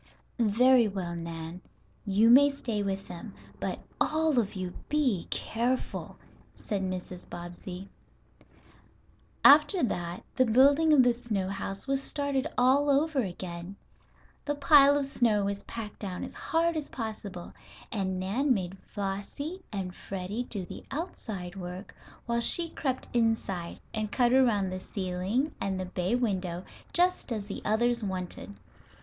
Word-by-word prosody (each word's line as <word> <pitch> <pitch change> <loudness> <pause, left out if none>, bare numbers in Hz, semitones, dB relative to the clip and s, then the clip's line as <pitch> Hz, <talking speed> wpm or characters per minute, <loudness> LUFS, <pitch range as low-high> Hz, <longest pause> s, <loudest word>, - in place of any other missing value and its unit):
"Very 240 +2 +5
well, 185 -4 -3
Nan, 165 +1 -6 0.4
you 210 +3 +5
may 285 +3 +8
stay 240 -7 -3
with 195 -1 -2
them. 185 +4 -8 0.2
But - - -3 0.2
all 310 -3 +2
of 205 -4 -1
you 185 -1 -4 0.2
be 265 - +1
careful," 245 +3 -2 0.4
said 205 -3 -3
Mrs. 185 -1 -5
Bobbsey. 175 +2 -7 1.6
After 300 +5 +7
that 175 -6 -2
the 255 - +4
building 280 +7 +5
of 285 -4 +7
the 245 -1 +4
snow 215 -6 -2
house 195 0 -4
was 275 0 +1
started 285 0 -1
all 270 +4 +4
over 290 +1 +3
again. 175 -2 -6 0.7
The 290 - -1
pile 285 0 +7
of 285 - 0
snow 230 -7 +2
was 200 0 -2
packed 220 -3 -7
down 185 -3 -4
as - - -6
hard 335 0 0
as 305 -2 -3
possible, 210 -6 -6 0.4
and 190 -4 -1
Nan 245 +9 +1
made 190 -1 -4 0.2
Flossie 205 - -4
and 190 -3 -3
Freddie 195 +5 -4
do 200 -6 -3
the - - -9
outside 215 - -5
work 180 +1 -7 0.3
while 235 0 0
she 335 +8 +1
crept 260 -3 -2
inside, 225 -7 0
and 215 -1 -2
cut 245 -1 +3
around 220 -8 +3
the 185 - -3
ceiling 190 +10 -2
and 190 -1 -1
the 185 - -2
bay 180 +4 -1
window 185 -7 -1 0.3
just 360 -5 +2
as 215 -3 -2
the 200 - -6
others 235 +2 +2
wanted. 185 - -4
215 Hz, 145 wpm, -29 LUFS, 185-265 Hz, 1.6 s, may